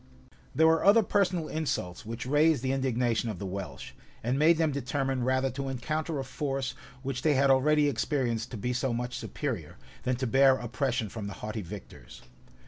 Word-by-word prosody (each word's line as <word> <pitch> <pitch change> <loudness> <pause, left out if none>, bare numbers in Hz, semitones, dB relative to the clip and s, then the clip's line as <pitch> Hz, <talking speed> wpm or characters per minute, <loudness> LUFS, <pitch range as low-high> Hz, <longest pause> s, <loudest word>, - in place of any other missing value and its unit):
There 160 +4 +5
were 160 0 +4
other 215 +3 +6
personal 185 -5 +1
insults 105 - -3
which 115 +2 -5
raised 150 0 +3
the 130 - +1
indignation 125 -3 0
of 105 - -4
the 100 - -5
Welsh, 90 -8 -6 0.3
and 125 +4 0
made 160 +2 +5
them 160 -2 +2
determine 135 -1 -1
rather 130 +1 +1
to 135 +2 -4
encounter 155 +5 -2
a 135 - -2
force 135 0 -3 0.3
which 135 -1 -3
they 150 -1 +3
had 135 +1 +4
already 150 +3 +4
experienced 125 -3 -1
to 120 - -6
be 125 +4 -2
so 125 0 0
much 125 +1 -3
superior, - - -4 0.3
than 125 0 0
to 130 +2 -2
bear 135 +2 +5
oppression 120 -1 -1
from 105 0 -6
the 100 - -5
haughty 110 0 -3
victors. 100 -6 -10
130 Hz, 185 wpm, -29 LUFS, 120-145 Hz, 0.3 s, other